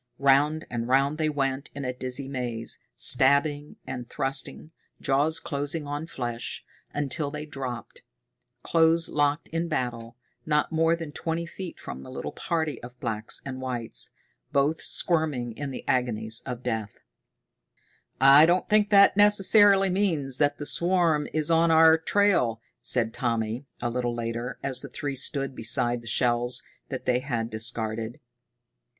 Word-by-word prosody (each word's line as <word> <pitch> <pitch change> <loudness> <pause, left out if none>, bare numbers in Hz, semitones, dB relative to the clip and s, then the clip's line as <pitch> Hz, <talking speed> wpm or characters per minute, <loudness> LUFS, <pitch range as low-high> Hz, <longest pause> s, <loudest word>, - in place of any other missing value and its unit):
Round 140 +3 +3
and 120 -1 -3
round 135 +4 +2
they 155 -1 +1
went 135 -2 -2
in 140 -2 -5
a 125 - -2
dizzy 130 +1 -3
maze, 120 -4 -4 0.2
stabbing 145 +2 +3
and 125 -2 -6
thrusting, 135 +3 -2 0.3
jaws 145 +4 +1
closing 145 +1 -4
on 145 +2 -4
flesh, 120 -6 -5 0.3
until 145 +1 -1
they 150 +1 -6
dropped, 130 -5 -7 0.6
close 165 0 +3
locked 145 +1 0
in 165 +1 -2
battle, 120 -6 -3 0.3
not 150 0 +1
more 165 +1 +3
than 165 -3 -7
twenty 165 +3 -3
feet 175 +1 -8
from 65 - -8
the - - -11
little - - -5
party 160 -6 -2
of 125 +1 -11
blacks 110 -2 -4
and 130 -1 -6
whites, 120 -3 -3 0.4
both 145 +3 +1
squirming 150 -9 0
in 145 +2 -5
the 130 - -8
agonies 115 -3 0
of 125 -1 -5
death. 110 -2 -3 1.2
"I 140 +4 +8
don't 175 +1 +2
think 210 -1 +3
that 200 -2 +6
necessarily 205 -1 +5
means 160 -9 0
that 145 -1 +2
the 145 - -6
swarm 170 -3 +2
is 155 +1 -1
on 165 0 +4
our 160 0 +6
trail," 165 - +2 0.2
said 115 -3 +2
Tommy, 115 +1 -2 0.2
a 120 - 0
little 120 -1 -2
later, 120 +2 -4
as 130 -2 -1
the - - -8
three 145 -1 -4
stood 135 0 0
beside 120 +1 0
the 120 - -14
shells 120 +1 +1 0.3
that - - -5
they 125 -1 +2
had 120 -4 -3
discarded. 110 0 -2
140 Hz, 150 wpm, -26 LUFS, 120-160 Hz, 1.2 s, I